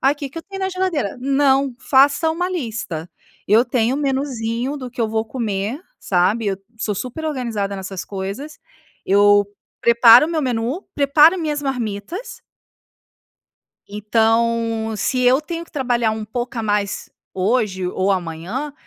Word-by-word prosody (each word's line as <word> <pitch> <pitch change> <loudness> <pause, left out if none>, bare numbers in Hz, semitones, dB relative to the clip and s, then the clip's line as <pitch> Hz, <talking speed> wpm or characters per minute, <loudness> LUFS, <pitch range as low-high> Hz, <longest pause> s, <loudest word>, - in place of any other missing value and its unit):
"Ai, 275 +2 +3
que 285 -2 -6
que 330 - -7
eu - - -8
tenho 390 +2 -9
na 380 0 -1
geladeira?". 355 - -2
Não, 270 0 +2
faça 280 +5 +3
uma 355 +3 -1
lista. 230 - -4 0.4
Eu 215 +4 +5
tenho 245 0 0
um 285 - -2
menuzinho 265 -1 -2
do 255 -2 -7
que 250 - -23
eu 225 - +2
vou 220 0 0
comer, 220 0 -3 0.2
sabe, 195 +5 +1 0.3
sou 210 -1 -2
super 255 +10 -5
organizada 230 -9 -2
nessas 190 -1 -6
coisas. 200 +10 -6 0.5
Eu 205 +1 +5 0.4
preparo 235 +2 +7
o - - -5
meu 325 -2 0
menu, 250 - -2
preparo 295 +4 +5
a - - -4
minhas 300 -3 -2
marmitas. 265 - -4 1.5
Então, 225 +1 0
se 255 +5 0
eu 250 +2 +4
tenho 335 +2 -6
que - - -24
trabalhar 245 -5 +1
um 220 0 -4
pouco 240 +3 -4
a - - -1
mais 205 -2 -1 0.2
hoje 190 -1 0
ou 185 +2 0
amanhã, 185 - -3
240 Hz, 155 wpm, -20 LUFS, 210-280 Hz, 1.5 s, preparo